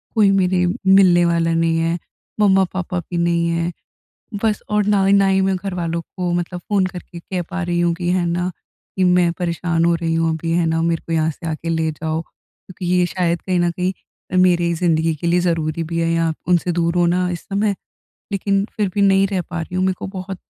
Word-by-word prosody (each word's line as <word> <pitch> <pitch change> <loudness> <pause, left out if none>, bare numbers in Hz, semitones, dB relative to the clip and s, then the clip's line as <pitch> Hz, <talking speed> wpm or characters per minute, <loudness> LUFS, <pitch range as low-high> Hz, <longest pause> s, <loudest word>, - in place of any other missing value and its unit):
कोई 210 -3 +5
मेरे 185 -2 +2 0.2
मिलने 190 -2 +6
वाला 165 -1 +1
नहीं 165 0 +1
है, 165 +1 0 0.4
मम्मा-पापा 190 -3 +2
भी 175 +1 -6
नहीं 170 0 +1
हैं। 170 +1 -1 0.7
बस 215 -2 +1
और 210 -1 +2
ना 200 -2 +3
ही 195 - +4
ना 200 -1 +4
ही 190 0 +3
मैं 190 0 +1
घरवालों 175 -3 -3
को 180 +1 -4
मतलब 175 +1 -2
फ़ोन 195 +1 0
करके 175 -1 -9
कह 180 +1 -4
पा 185 0 -3
रही 175 0 -1
हूँ 175 0 +2
कि, 175 +1 -3
है 180 -1 +1
ना 175 +2 -1 0.5
कि 190 - +2
मैं 180 -1 +4
परेशान 170 -1 0
हो 170 0 +3
रही 165 -1 -2
हूँ 165 0 +1
अभी, 165 +1 -3
है 170 0 +2
ना, 165 0 +1
मेरे 165 0 0
को 165 - -2
यहाँ 160 0 +1
से 165 +3 -9
आके 160 +1 -4
ले 160 -1 0
जाओ। 160 +1 -3
क्योंकि 180 +2 -13
ये 180 0 +3
शायद 175 -1 -1
कहीं 185 -2 0
न 175 0 +2
कहीं 180 +2 -1 0.5
मेरे 180 -1 +4
ही 170 - +1
ज़िन्दगी 165 -1 +1
के 165 +3 -4
लिए 175 +1 +3
ज़रूरी 165 -2 -1
भी 165 +1 -4
है 165 0 +1
या 165 -1 +1
उनसे 180 0 +2
दूर 170 0 0
होना 175 +1 +2
इस 170 - -5
समय। 200 +1 -1 0.6
लेकिन 195 0 0
फिर 210 -3 +1
भी 205 - 0
नहीं 195 0 +4
रह 190 -2 -1
पा 175 0 -5
रही 170 +2 -7
हूँ। 185 - +1
मेरे 190 - +2
को - - -5
बहुत 190 0 -6
175 Hz, 220 wpm, -20 LUFS, 165-185 Hz, 0.7 s, मिलने